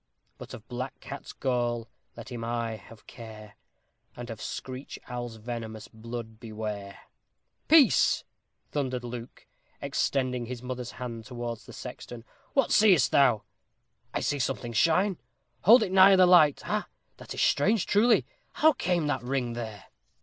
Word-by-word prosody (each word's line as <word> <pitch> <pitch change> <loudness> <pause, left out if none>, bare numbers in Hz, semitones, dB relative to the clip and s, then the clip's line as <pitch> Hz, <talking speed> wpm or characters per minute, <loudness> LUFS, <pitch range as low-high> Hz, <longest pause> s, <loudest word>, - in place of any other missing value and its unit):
But - - -8
of 110 - -14
black 130 +1 -5
cat's 140 - -8
gall 120 -3 -1 0.3
let 115 +2 -9
him 120 -2 -5
aye 115 -1 -2
have 110 +1 -15
care, 110 -3 -11 0.6
And 120 -1 -7
of 110 - -8
screech 130 +1 -6
owl's 120 -2 -5
venomous 110 -1 -6
blood 110 0 -8
beware! 105 -3 -6 0.7
"Peace!" 310 -3 +5 0.5
thundered 130 -4 -2
Luke, 120 0 -8 0.3
extending 125 -3 -1
his 125 0 -7
mother's 125 -1 -5
hand 115 -3 -7
towards 120 -2 -6
the - - -11
sexton. 120 -2 -9 0.3
"What 275 -3 +2
seest 190 - +5
thou?" 120 -7 +4 0.7
"I - - -2
see 145 -1 -1
something 125 -2 -2
shine. 180 - +2 0.5
Hold 225 +4 +8
it 190 - -3
nigher 190 0 +7
the 185 - +7
light. 165 -5 +6
Ha! - - -2 0.3
that - - -9
is - - -2
strange, 195 +7 +2
truly. 225 +3 +4 0.3
How 315 0 +4
came 180 - 0
that 145 -3 -1
ring 125 -1 -2
there?" 110 -4 -7
125 Hz, 145 wpm, -28 LUFS, 115-145 Hz, 0.7 s, Hold